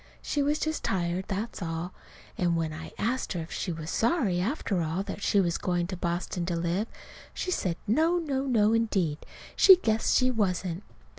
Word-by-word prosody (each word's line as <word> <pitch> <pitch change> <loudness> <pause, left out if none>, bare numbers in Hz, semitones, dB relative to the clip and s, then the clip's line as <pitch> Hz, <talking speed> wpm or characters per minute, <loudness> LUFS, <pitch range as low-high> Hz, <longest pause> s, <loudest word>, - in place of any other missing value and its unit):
She 290 - 0
was 290 +2 +2
just 315 0 -2
tired; 180 0 -1
that's 205 +3 -4
all. 165 +1 -4 0.4
And 175 -2 +1
when 160 -2 -1
I 160 +1 -8
asked 245 +2 -1
her 175 - -3
if 160 - -9
she 180 - -3
was 160 0 -5
sorry, 225 - +1
after 200 - -1
all, 165 +4 -1
that 200 0 -6
she 200 - +3
was 170 -3 +1
going 175 -1 0
to 185 +2 -5
Boston 175 0 -2
to 175 - 0
live, 175 +6 -1 0.5
she 365 - -2
said, 180 - -1
no, 320 +11 +3
no, 275 -5 -1
no, 220 -4 +3
indeed, 195 -9 +1 0.4
she 380 - +9
guessed 225 -10 +1
she 255 0 +3
wasn't. 185 -5 -1
190 Hz, 190 wpm, -28 LUFS, 170-235 Hz, 0.5 s, she